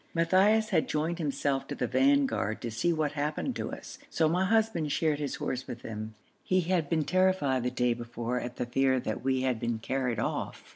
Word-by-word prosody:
Matthaios 195 +6 +4
had 160 -5 +2
joined 160 +3 -1
himself 140 -3 -1
to - - -4
the - - -1
vanguard 270 - +2
to 120 - -3
see 120 +10 +1
what 155 -3 0
happened 150 - -2
to - - -3
us, - - -9
so 160 - +2
my 180 +4 +2
husband 215 -7 +1
shared 155 -1 +1
his 145 -2 -2
horse 130 0 -3
with 120 - -7
him; 110 0 -6 0.3
he 185 0 +2
had 170 -3 0
been 160 -2 +2
terrified 185 -7 +2
the 125 - 0
day 125 -1 +1
before 120 +1 -3
at 120 - -6
the 125 - -2
fear 130 +2 +2
that - - -4
we 130 0 +1
had 130 -3 0
been 115 -1 -1
carried 125 +1 -2
off. - - -3
145 Hz, 205 wpm, -29 LUFS, 125-175 Hz, 0.3 s, Matthaios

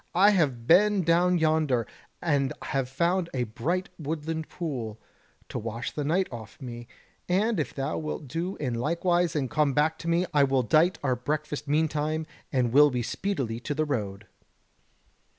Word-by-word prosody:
I 200 +4 +7
have 140 - +1
been 195 - +5
down 175 +2 +3
yonder, 155 -7 +2 0.4
and 140 -5 +1
have 135 -2 -1
found 170 +5 +1
a 125 - +1
bright 150 - -2
woodland 160 +1 -3
pool, 120 -11 -4 0.5
to - - -3
wash 115 +4 -4
the 150 - -3
night 175 +6 +1
off 110 -3 -9
me, 120 -3 -8 0.4
and 205 +3 +2
if 150 - -3
thou 135 -12 -2
wilt 75 - -5
do 170 +8 -3
in 130 -5 -3
likewise 170 +6 +1
and 140 -3 0
come 145 +1 +1
back 150 +3 +1
to 165 - -7
me, 170 +2 +2
I 145 -1 +5
will 135 -2 +2
dight 155 - +3
our 130 -3 +2
breakfast 150 +3 -3
meantime, 155 +1 0 0.3
and 125 -3 +1
will 150 +2 +7
we 125 -3 -2
speedily 130 - -2
to 145 +4 -4
the 155 +1 +1
road." 105 -8 -3
150 Hz, 170 wpm, -27 LUFS, 125-170 Hz, 0.5 s, I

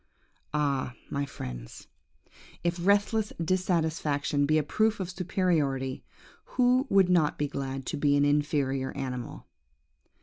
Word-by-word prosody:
"Ah, 140 -4 0 0.2
my 140 0 -1
friends, - - -8 0.8
if 170 0 -1
restless 205 +2 +2
dissatisfaction 160 -5 0
be 155 +1 +3
a 155 - +2
proof 215 +8 +1
of 185 -2 -3
superiority, 160 -8 0 0.5
who 255 +1 +4
would 195 -2 +5
not 170 -5 +2
be 145 - 0
glad 135 -1 -4
to - - -3
be 145 0 +3
an 145 - +4
inferior 145 -2 +1
animal? 125 -3 -5
150 Hz, 125 wpm, -28 LUFS, 140-180 Hz, 0.8 s, would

